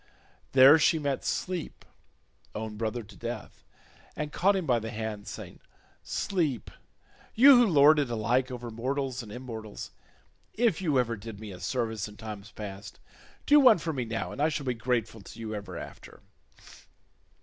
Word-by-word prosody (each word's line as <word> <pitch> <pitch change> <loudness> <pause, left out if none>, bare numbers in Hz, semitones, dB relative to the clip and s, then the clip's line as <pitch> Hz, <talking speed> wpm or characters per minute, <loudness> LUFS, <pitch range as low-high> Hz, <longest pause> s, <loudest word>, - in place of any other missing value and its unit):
There 135 +4 +8
she 160 - +4
met 140 -3 -2
Sleep, 180 -3 -3 0.7
own 110 0 -5
brother 115 +2 -3
to 100 -1 -15
Death, 120 -2 -7 0.5
and 150 0 -4
caught 195 +2 +3
him 190 -3 -1
by 125 -4 +2
the 110 0 -6
hand, 110 -2 -5
saying, - - -8 0.4
"Sleep, 160 - -2 0.6
you 270 +4 +9
who 240 -1 +5
lord 150 -3 +6
it 140 -4 0
alike 120 +3 +1
over 120 -2 -6
mortals 130 +2 -2
and 110 -3 -11
immortals, 110 -3 -7 0.6
if 220 -6 +2
you 155 -7 +1
ever 120 -2 +1
did 105 -1 -9
me 105 -2 -8
a 90 - -10
service 110 0 -2
in 105 0 -13
times 105 -2 -8
past, 100 -2 -8 0.5
do 295 +1 +7
one 250 -6 +7
for 165 -1 -3
me 130 -3 -2
now, 115 0 -3
and 140 - -5
I 155 - +4
shall 150 -2 -3
be 125 - 0
grateful 115 -2 -2
to 110 - -12
you 110 -1 -5
ever 100 -4 -6
after. - - -11
120 Hz, 170 wpm, -28 LUFS, 110-150 Hz, 0.7 s, you